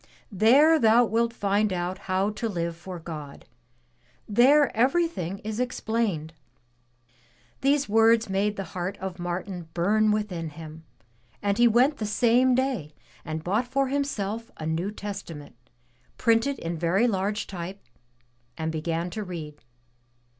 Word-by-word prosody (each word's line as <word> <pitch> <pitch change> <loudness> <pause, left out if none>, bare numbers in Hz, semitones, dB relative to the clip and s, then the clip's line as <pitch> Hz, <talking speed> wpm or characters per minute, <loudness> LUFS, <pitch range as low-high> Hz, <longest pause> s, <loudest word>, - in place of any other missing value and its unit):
There 275 - +5
thou 230 0 +5
wilt 230 +1 +1
find 205 -1 0
out 180 +1 -3
how 190 +2 +1
to 220 +2 -3
live 170 -3 -3
for 180 +2 -8
God. 155 -4 -8 0.8
There 265 +6 +4
everything 255 - +1
is 215 +1 -4
explained.'' 220 -9 -2 1.3
These 280 +1 +2
words 225 +1 +4
made 200 +2 0
the 195 - -4
heart 185 +2 -3
of 190 -1 -6
Martin 175 -1 -5
bum 210 +5 +3
within 195 -6 -2
him, 160 +1 -11 0.5
and 200 +2 -1
he 240 - +7
went 255 +6 +3
the 215 - -3
same 245 +4 +3
day 245 - -1 0.3
and 155 0 -5
bought 210 +8 0
for 275 +1 0
himself 230 -6 -2
a 155 - -6
New 165 +5 -1
Testament, 195 -9 -7 0.6
printed 235 +4 +2
in 165 0 -4
very 185 +8 +2
large 205 -1 -1
type, 185 +1 -7 0.7
and 160 0 -2
began 165 +2 -2
to 215 - -4
read. 160 -5 -8
205 Hz, 135 wpm, -26 LUFS, 175-230 Hz, 1.3 s, he